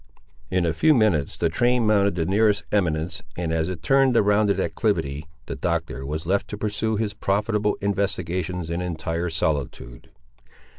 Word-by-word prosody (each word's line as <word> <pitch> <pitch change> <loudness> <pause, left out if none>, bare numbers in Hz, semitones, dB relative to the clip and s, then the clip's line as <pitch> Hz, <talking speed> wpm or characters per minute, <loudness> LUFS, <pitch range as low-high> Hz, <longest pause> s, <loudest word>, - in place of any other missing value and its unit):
In 90 -2 +1
a 80 - +1
few 155 -1 +4
minutes 100 - +1
the 85 - +1
train 120 +7 +2
mounted 100 -3 +3
the 85 -2 0
nearest 105 +2 +2
eminence, 85 -5 0 0.2
and, 85 -2 -2
as 80 +1 0
it 85 -3 -6
turned 135 -2 +3
the 115 - +5
rounded 105 0 +2
acclivity, 70 +3 -1 0.2
the - - -5
Doctor 65 +3 -2
was 80 +3 -4
left 100 +3 0
to 105 - -6
pursue 110 +1 -1
his 105 -1 -1
profitable 105 +1 0
investigations 90 -3 -2
in 85 +1 -2
entire 85 0 -3
solitude. 70 -6 -3
95 Hz, 160 wpm, -24 LUFS, 80-105 Hz, 0.2 s, the